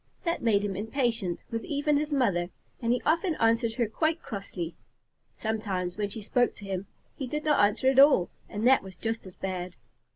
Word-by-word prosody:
That 335 -1 -1
made 205 -3 +3
him 195 -2 -2
impatient 225 -3 -1
with 230 0 -2
even 290 0 +1
his 300 +1 -2
mother, 200 -11 +1 0.3
and 230 -1 +1
he 245 - +1
often 330 +2 +2
answered 230 -1 +2
her 235 - +1
quite 315 +9 0
crossly. 185 -5 -5 0.6
Sometimes, 195 -5 -2
when 205 -1 -2
she 215 +1 -5
spoke 245 +3 +1
to 205 - -11
him, 190 0 -4 0.3
he 265 - -4
did 300 +4 -3
not 300 -7 +4
answer 210 +5 +2
at 265 0 +5
all, 275 -11 +6 0.2
and 210 +2 -3
that 260 +1 +6
was 190 -1 -11
just 225 -3 -3
as 185 - -12
bad. 185 -2 -4
225 Hz, 195 wpm, -28 LUFS, 195-265 Hz, 0.6 s, all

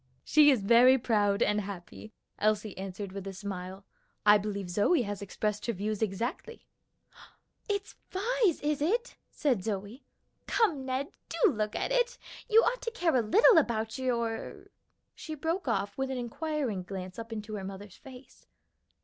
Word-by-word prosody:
"She 300 -1 +6
is 255 -8 +3
very 240 +5 +7
proud 205 -5 +2
and 210 0 +1
happy," 200 +2 -9 0.3
Elsie 210 -1 0
answered 195 +1 -6
with 195 0 -7
a 195 - -5
smile. 190 0 -7 0.4
"I 210 0 +7
believe 200 -2 -4
Zoe 210 - +2
has 205 -2 -5
expressed 210 +2 -3
her 235 - 0
views 210 +2 -3
exactly." 235 - -3 1.0
"It's 405 -1 -2 0.2
Vi's, 425 -2 +1
is 295 -1 -1
it?" 465 +11 0
said 250 -11 0
Zoe. 205 +4 -4 0.4
"Come, 320 - +1
Ned, 260 +2 -2 0.2
do 440 -7 +3
look 215 -3 -2
at - - -2
it. - - +1 0.3
You 450 +1 +6
ought - - 0
to 465 - -2
care 355 - 0
a 250 - +4
little 390 - +6
about 225 -4 -2
your 235 -3 -2 0.2
" - - -49
She 315 - -7
broke 325 +3 -2
off 200 -4 -1
with 270 0 -1
an 265 - -3
inquiring 250 - -2
glance 185 +1 -7
up 230 0 -7
into 215 -1 -6
her 205 -2 -4
mother's 195 0 -8
face. 260 -1 -15
230 Hz, 165 wpm, -30 LUFS, 200-300 Hz, 1.0 s, very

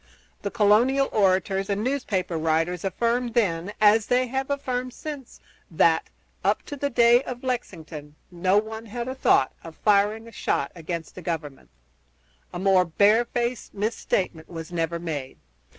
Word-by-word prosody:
The 200 - -2
colonial 235 +7 +3
orators 195 -1 +1
and 200 +1 -1
newspaper 220 -10 -1
writers 165 +2 0
affirmed 235 +4 -1
then, 185 -5 +1
as 215 +1 +5
they 250 +1 +3
have 265 +2 -3
affirmed 255 -3 -2
since, 290 -5 -8 0.3
that, 165 -1 +2 0.3
up - - +1
to 290 - -7
the 285 0 -2
day 235 -1 +5
of 250 -2 -7
Lexington, 160 - -5 0.2
no 185 +3 +2
one 220 +1 -3
had 235 +3 -5
a 260 - -3
thought 200 - +3
of 165 -1 -10
firing 210 +2 +2
a - - -11
shot 140 - -1
against 170 -1 -6
the 185 - -9
Government. 160 -5 -5 0.8
A - - -6
more 190 0 +4
barefaced 235 +7 +1
misstatement 195 -5 -2
was 165 -1 -7
never 170 0 -1
made. 150 -6 -5
205 Hz, 150 wpm, -25 LUFS, 170-240 Hz, 0.8 s, as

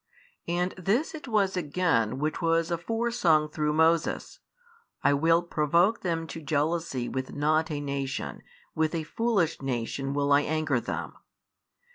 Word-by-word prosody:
And 175 +2 0
this 215 - 0
it 305 -3 -8
was 205 -5 +1
again 150 - +1
which 155 +2 -2
was 165 0 +1
afore 225 +8 -1
sung 160 -10 +3
through 150 0 -1
Moses, 165 - +1 0.6
I - - +4
will 165 +4 +3
provoke 170 +6 +2
them 165 -3 -1
to 165 0 -8
jealousy 150 -3 -1
with 130 0 -4
not 155 +3 +2
a 150 -2 -2
nation, 140 -1 -4 0.3
with 160 +1 0
a 160 - -1
foolish 195 -4 0
nation 135 +2 -2
will 145 0 +2
I 140 - +6
anger 155 -3 0
them. - - -4
160 Hz, 145 wpm, -27 LUFS, 145-175 Hz, 0.6 s, I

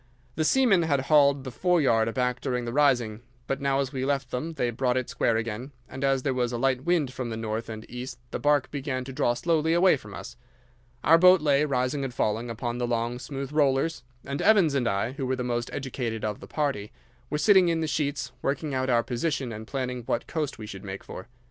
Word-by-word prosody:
The 155 - -1
seamen 225 -1 +4
had 145 -5 +1
hauled 140 -1 +4
the 130 - -6
foreyard 135 -8 +2
aback 125 +1 -1
during 125 -3 -2
the 120 - -4
rising, 125 -6 +2 0.2
but 135 +2 -3
now 140 0 +1
as 135 0 -4
we 130 -1 -2
left 135 -2 -1
them 155 +7 -3
they 125 -6 -1
brought 125 +1 0
it 130 - -1
square 115 - +1
again, 115 +5 -4
and 130 +1 -7
as 135 -1 +2
there 135 - 0
was 125 -1 0
a 120 - -2
light 130 +1 +1
wind 165 -7 +1
from 125 -1 -4
the 110 - -4
north 110 +1 -3
and 110 0 -7
east 125 +1 -7
the - - -3
barque 145 -2 +2
began 135 -3 -3
to 135 +1 -8
draw 125 -3 +1
slowly 160 +3 +1
away 175 -2 +5
from 105 -5 -11
us. - - -9 0.7
Our 165 +2 +6
boat 185 +1 +7
lay, 145 -1 +3
rising 130 0 0
and 135 - -3
falling, 115 0 -1
upon 120 +1 -3
the 120 - 0
long, 120 +1 -1
smooth 135 +1 -6
rollers, 150 +1 +1 0.2
and 140 +1 -3
Evans 195 -8 +5
and 130 -4 +1
I, 100 +3 0
who 135 -1 -4
were 130 - 0
the 125 - -3
most 120 -1 -2
educated 125 -5 -3
of 105 -1 -3
the - - -11
party, 135 -9 -2 0.4
were 150 - -1
sitting 190 +3 +5
in 165 -1 0
the - - 0
sheets 145 -1 -2
working 145 +1 -2
out 130 0 -1
our 120 -2 +3
position 130 +1 -2
and 110 0 -7
planning 125 -2 -3
what 120 - -1
coast 150 -5 -3
we 110 - -7
should 95 -2 -9
make 95 -1 -7
for. 95 - -9
130 Hz, 230 wpm, -27 LUFS, 120-145 Hz, 0.7 s, boat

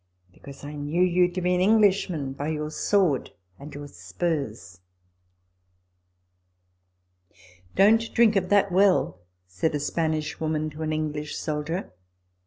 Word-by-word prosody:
" 90 0 -36
Because 140 +6 -13
I 145 +1 -7
knew 150 +4 0
you 180 0 +3
to 180 +1 -4
be 180 0 +2
an 180 - +1
English 205 -1 +4
man 145 -6 -3
by 145 +2 -5
your 155 -1 -3
sword 180 -5 +1 0.3
and 145 +2 -10
your 145 0 -8
spurs." 105 - -4 1.4
" 90 0 -31
Don't 225 +4 +4
drink 225 -2 +5
of 185 -2 0
that 200 -1 +3
well," 185 - +3 0.3
said 95 - -2
a - - -1
Spanish 155 0 -2
woman 155 -1 -2
to 150 +2 -10
an 155 0 -2
English 150 -1 -3
soldier. 155 - -4
150 Hz, 145 wpm, -25 LUFS, -, 1.4 s, drink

